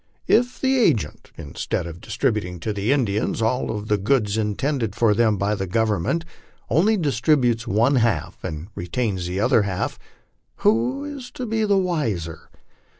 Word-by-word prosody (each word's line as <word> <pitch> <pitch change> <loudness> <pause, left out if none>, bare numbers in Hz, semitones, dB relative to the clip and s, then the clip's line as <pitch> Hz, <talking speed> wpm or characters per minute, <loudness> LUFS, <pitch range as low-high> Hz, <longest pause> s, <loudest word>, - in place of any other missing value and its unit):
If 245 +2 +2
the 265 0 +2
agent, 120 - +1
instead 80 +1 -3
of 85 +1 -8
distributing 100 -7 -1
to 105 - -2
the 100 +4 0
Indians 110 -9 0
all 115 +3 0
of 105 0 -4
the 105 -1 +1
goods 105 -1 +1
in 105 -2 0
tended 130 -7 -1
for 115 -3 +3
them 110 -1 +2
by 100 +2 0
the 95 -2 -3
Government, 110 - 0 0.5
only 210 +7 +4
distributes 125 - +1
one 115 +6 +3
half 95 -7 0
and 85 +1 -5
retains 95 0 -2
tho 90 +1 -3
other 105 +2 +4
half, 95 -3 -2 0.7
who 115 - +2
is 285 -4 -7
to 255 - -5
be 220 -1 0
the 200 -1 +3
wiser? 115 - -2
110 Hz, 160 wpm, -23 LUFS, 100-145 Hz, 0.7 s, only